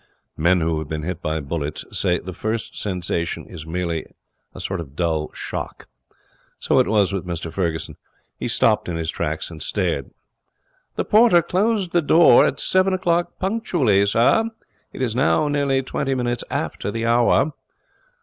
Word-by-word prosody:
Men 85 +3 +3
who 80 -1 0
have 80 - -5
been 75 -1 -3
hit 90 +1 -4
by 80 -2 -1
bullets 75 +1 -4
say 90 -1 +1
the 95 +2 -7
first 110 +4 -3
sensation 90 -3 -3
is 80 - -10
merely 85 -1 -2 0.4
a - - -11
sort 95 -2 -3
of 70 -4 -8
dull 80 -2 -1
shock. - - -6 0.7
So - - +2
it - - +3
was 100 -2 +2
with 95 -2 -3
Mr 85 -2 -4
Ferguson. 85 -4 -2 0.4
He - - -2
stopped - - +2
in 85 - -2
his 80 0 -2
tracks 80 0 -3
and 80 -2 -9
stared. - - -2 0.9
'The - - -1
porter 215 -6 +5
closes 195 +2 0
the 175 0 +2
door 160 -4 +6
at 140 - -3
seven 185 0 +2
o'clock 175 -1 0
punctually, 175 - +1
sir. 120 - +3 0.5
It - - -4
is 115 -3 -1
now 140 +3 +2
nearly 140 -2 +1
twenty 135 +1 -2
minutes 120 -1 -1
after - - -3
the 115 +2 -3
hour.' 120 +5 +3
100 Hz, 165 wpm, -22 LUFS, -, 0.9 s, door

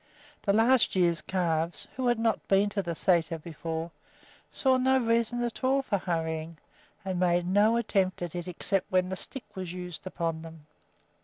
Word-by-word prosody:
The 200 - +1
last 225 +3 +4
year's 170 -3 +2
calves, 170 -2 -1
who 255 -1 -1
had 240 -1 +3
not 225 -1 0
been 200 +1 +3
to 205 0 -1
the 170 -3 -3
sæter 165 -1 +1
before, 165 +1 -5 0.6
saw 260 -1 +2
no 265 +1 +3
reason 235 0 +1
at 240 +2 -4
all 270 +1 +3
for 205 -6 0
hurrying, 160 -2 -3 0.5
and 185 -2 -2
made 175 -1 +2
no 205 +5 +4
attempt 195 -6 0
at 175 - -4
it 175 0 -5
except 185 +2 -2
when 185 0 +2
the 190 - -2
stick 265 +7 -6
was 185 -2 -5
used 180 -1 -6
upon 165 -3 -2
them. 160 -2 -11
185 Hz, 175 wpm, -28 LUFS, 170-225 Hz, 0.6 s, last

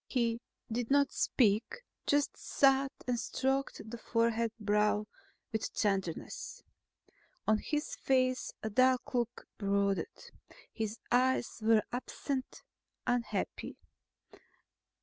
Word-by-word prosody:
He 235 -2 0 0.3
did 235 0 -1
not 280 0 +4
speak, 220 - +2 0.2
just 290 0 +2
sat 270 0 +3
and 245 -1 0
stroked 270 -3 -1
the 235 - -6
fevered 230 0 +1
brow 210 0 +2 0.5
with 220 -2 -2
tenderness. 195 -5 -2 0.8
On 215 0 +4
his 300 +5 -2
face 255 -1 +1
a 220 - -2
dark 255 +4 +3
look 240 0 -1
brooded. 200 - 0 0.4
His 220 0 -3
eyes 255 -1 +2
were 220 0 +5
absent, 260 +1 -4 0.4
unhappy. 245 -1 -1
235 Hz, 100 wpm, -33 LUFS, 215-260 Hz, 0.8 s, were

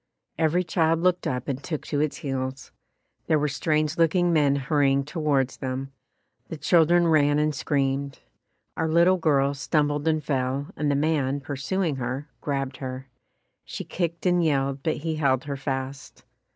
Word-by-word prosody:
Every 165 +3 +2
child 165 -1 +1
looked 180 0 +1
up 125 -1 -3
and 135 -1 -3
took 155 -4 -4
to 145 - -2
its 150 -1 0
heels. 130 -1 -4 0.6
There 155 - +3
were 150 0 +1
strange 155 +2 0
looking 175 +1 +3
men 145 -3 +3
hurrying 140 -1 +1
towards 145 -4 0
them. 135 0 -4 0.6
The 160 - -6
children 170 +2 +4
ran 145 -2 +4
and 150 0 +1
screamed. 140 0 -1 0.6
Our 160 - -1
little 170 +3 +4
girl 140 -4 +2
stumbled 145 +1 0
and 155 -1 +1
fell, 135 +1 -1
and 150 -1 -1
the 140 - +2
man, 145 -2 +1
pursuing 140 +4 -2
her, 130 +4 -4
grabbed 135 -2 -2
her. 130 0 -6 0.5
She - - -6
kicked 170 -1 -3
and 175 -1 +3
yelled 140 -3 0
but 160 +2 -1
he 160 +1 -3
held 135 -4 +2
her 145 -1 -4
fast. 135 0 -5
145 Hz, 160 wpm, -25 LUFS, 135-160 Hz, 0.6 s, children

